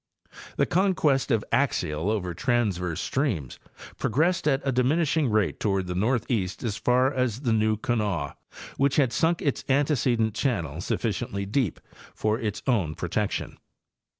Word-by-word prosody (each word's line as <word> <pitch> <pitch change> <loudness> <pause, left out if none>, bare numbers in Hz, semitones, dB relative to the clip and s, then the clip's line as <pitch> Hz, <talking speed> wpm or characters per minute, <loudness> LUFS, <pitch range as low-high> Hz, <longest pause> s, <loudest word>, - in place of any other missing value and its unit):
The - - +3
conquest 165 -8 +2
of 115 -5 +2
axial 75 +5 0
over 95 -5 -1
transverse 95 -6 0
streams 110 - -2 0.4
progressed 160 - +1
at 135 -2 +3
a 135 - +2
diminishing 145 +3 +2
rate 105 -8 +1
toward 95 -3 0
the 90 - -3
northeast 110 -2 -1
as 110 -4 -1
far 125 +4 +2
as 125 -2 -1
the 120 -5 +1
New 110 0 +2
_Kanawha, 105 -10 -1 0.4
which 140 0 +2
had 130 -5 +2
sunk 165 +7 +1
its 140 - 0
antecedent 130 -6 +2
channel 110 - -1
sufficiently 100 0 -2
deep 105 - -1 0.4
for 110 +1 0
its 105 -2 -3
own 95 - +1
protection. - - -2
115 Hz, 140 wpm, -26 LUFS, 100-135 Hz, 0.4 s, The